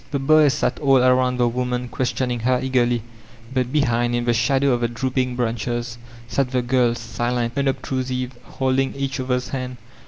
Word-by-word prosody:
The 140 - -1
boys 145 +1 +4
sat 150 - -1
all 135 -2 +4
about 125 0 +3
the 120 -1 +3
wonuui 125 0 -2
questioning 125 -1 -1
her 125 +2 +1
eagerly, 120 -3 +1 0.5
but 130 -1 0
behind 120 -4 +1
in 120 0 -1
the 120 - +2
shadow 135 +4 +2
of 120 -1 +1
the 120 - +2
drooping 125 +1 -1
branches 120 0 -2 0.3
sat 135 +1 0
the 125 -1 0
girb» 120 -1 +2
silent, 120 +1 -2
unobtrusive, 130 -2 -1
holding 135 +2 -1
each 140 0 -3
other's 125 -1 -1
hands. 130 -2 -4
125 Hz, 165 wpm, -22 LUFS, 120-130 Hz, 0.5 s, boys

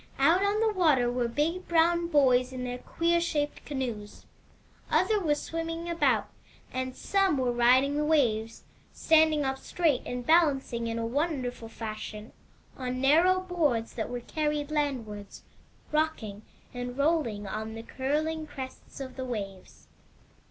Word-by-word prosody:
Out 345 +3 +4
on 410 +2 +1
the 445 -1 +2
water 295 -10 +3
were 245 -1 0
big 320 +9 -1
brown 340 +1 +3
boys 260 -5 +3
in 255 -1 -5
their 250 0 -4
queer 340 +5 +1
shaped 295 -3 -2
canoes; 240 -7 -5 0.6
others 430 -2 +2
were 300 -4 +2
swimming 330 +2 -4
about, 340 0 +2 0.5
and 255 0 -3
some 390 -6 +1
were 255 -2 +1
riding 255 +4 +4
the 300 - +1
waves, 230 -8 +1 0.3
standing 315 -2 +3
up 265 0 -2
straight 315 -6 +1
and 245 0 -4
balancing 270 -8 +2
in 230 0 -2
a 230 - -2
wonder 275 0 -1
ful 230 -2 -11
fashion 215 -1 -7 0.4
on 255 -1 -4
narrow 335 +8 +4
boards 305 -11 0
that 220 - -3
were 245 0 -4
carried 300 +2 -2
landwards, 240 -9 -3 0.5
rocking, 300 -10 -1 0.3
and 245 0 -5
rolling, 280 -9 +1
on 220 +2 -5
the 225 - -7
curling 310 +6 -2
crests 265 -2 -9
of 260 -2 -7
the 260 - -3
waves. 200 -6 -7
275 Hz, 145 wpm, -28 LUFS, 240-320 Hz, 0.6 s, Out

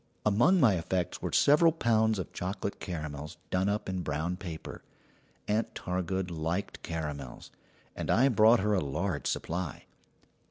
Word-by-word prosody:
Among 120 - +4
my 110 - +4
effects 90 +1 -2
were - - -3
several 150 +3 +5
pounds 110 -7 +2
of 95 - -5
chocolate 95 +2 -4
caramels 75 -4 -6
done 95 +2 +1
up 105 +1 -2
in 95 -1 -2
brown 80 +3 -2
paper. 85 -4 -7 0.7
Aunt 110 +2 0
Targood 90 0 -2
liked 85 +4 -3
caramels, 75 -6 -6 0.4
and - - -4
I 130 +4 +5
brought 115 -1 +5
her 105 +1 +1
a 95 - +2
large 75 +3 -2
supply. 90 +2 -3
95 Hz, 145 wpm, -30 LUFS, 80-105 Hz, 0.7 s, several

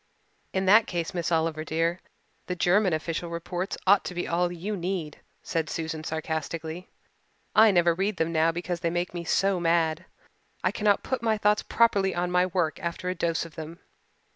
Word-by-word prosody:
"In 190 0 -1
that 210 +4 +6
case, 170 -2 -3
Miss 175 -1 -2
Oliver 160 -1 0
dear, 165 +2 0 0.5
the 180 - -2
German 185 +3 +3
official 165 +2 -2
reports 175 +3 -4
ought 200 +1 +5
to 180 - -5
be 175 - -2
all 175 +1 +1
you 185 +5 -4
need," 175 -4 -4 0.2
said 160 -2 -2
Susan 160 -1 -4
sarcastically. 160 +2 -4 0.7
"I 220 0 +8
never 175 -3 +4
read 195 +3 -1
them 165 +1 0
now 160 0 +3
because 175 +1 -4
they 170 -1 0
make 175 +1 -2
me 175 -1 -4
so 195 +2 +1
mad 165 -1 +1 0.6
I - - +2
cannot 210 -1 +2
put 260 -2 -2
my 220 -2 +1
thoughts 210 0 +2
properly 200 -5 +2
on 175 0 -1
my 180 0 +3
work 175 -3 -1
after 170 +1 -3
a - - 0
dose 170 -2 -1
of 165 - -12
them. 160 +2 -8
175 Hz, 185 wpm, -27 LUFS, 165-190 Hz, 0.7 s, I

